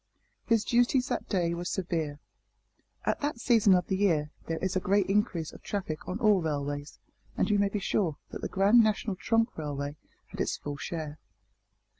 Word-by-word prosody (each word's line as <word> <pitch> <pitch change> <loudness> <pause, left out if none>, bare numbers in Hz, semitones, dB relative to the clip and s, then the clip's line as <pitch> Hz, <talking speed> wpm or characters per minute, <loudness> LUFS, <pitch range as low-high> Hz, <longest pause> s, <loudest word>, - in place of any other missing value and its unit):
His 230 -3 +3
duties 245 +2 +3
that - - -2
day 175 -4 +1
were 170 +1 -4
severe. 165 -5 -2 0.9
At - - 0
that 290 -3 -1
season 225 -6 +5
of 180 -1 +1
the 190 - -1
year 160 -7 +2 0.2
there 165 - -1
is 190 +2 -2
a - - +3
great 195 +1 +2
increase 195 -5 0
of - - -12
traffic 180 -7 -4
on 185 - -2
all 210 -5 +4
railways, 145 -2 -3 0.4
and - - +2
you 205 - +3
may 200 0 +3
be 210 - -2
sure 190 -5 0
that - - -6
the - - -3
Grand 205 +4 +5
National 215 -1 0
Trunk 225 +4 +1
Railway 145 -1 -4 0.3
had - - -5
its - - -1
full 145 -1 -6
share. 155 -1 -5
185 Hz, 185 wpm, -29 LUFS, 155-210 Hz, 0.9 s, season